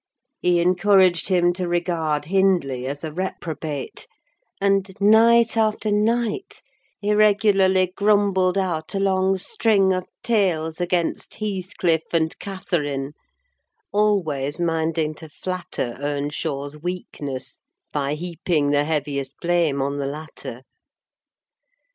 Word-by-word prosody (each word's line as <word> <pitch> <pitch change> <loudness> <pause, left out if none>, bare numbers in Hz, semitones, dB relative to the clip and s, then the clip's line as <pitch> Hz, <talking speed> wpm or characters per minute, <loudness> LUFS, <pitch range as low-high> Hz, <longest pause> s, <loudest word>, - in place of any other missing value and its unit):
He 175 -1 +2
encouraged 180 0 +4
him 175 -2 +3
to 180 0 -3
regard 170 -4 -1
Hindley 175 -9 +1
as 145 +2 -5
a 160 - -4
reprobate; 160 -5 -5 0.5
and, 195 0 +2
night 230 +3 +5
after 215 -1 +1
night, 225 - 0 0.4
he 210 0 0
regularly 195 -3 +3
grumbled 200 -3 +2
out 175 -3 -2
a - - 0
long 190 0 +2
string 195 0 +2
of 185 -1 -3 0.2
tales 180 -8 0
against 175 -1 -1
Heathcliff 185 -5 -1
and 160 -1 +1
Catherine: 150 -8 -3 0.8
always 160 -9 +1
minding 160 -2 0
to 155 +1 -12
flatter 175 -7 -4
Earnshaw's 145 0 -3
weakness 150 -6 -5 0.3
by 145 0 -1
heaping 165 -3 -1
the 145 0 +2
heaviest 140 -3 -2
blame 170 -6 +1
on 140 +1 -2
the 140 -1 -2
latter. 145 -4 -8
175 Hz, 110 wpm, -23 LUFS, 150-195 Hz, 0.8 s, night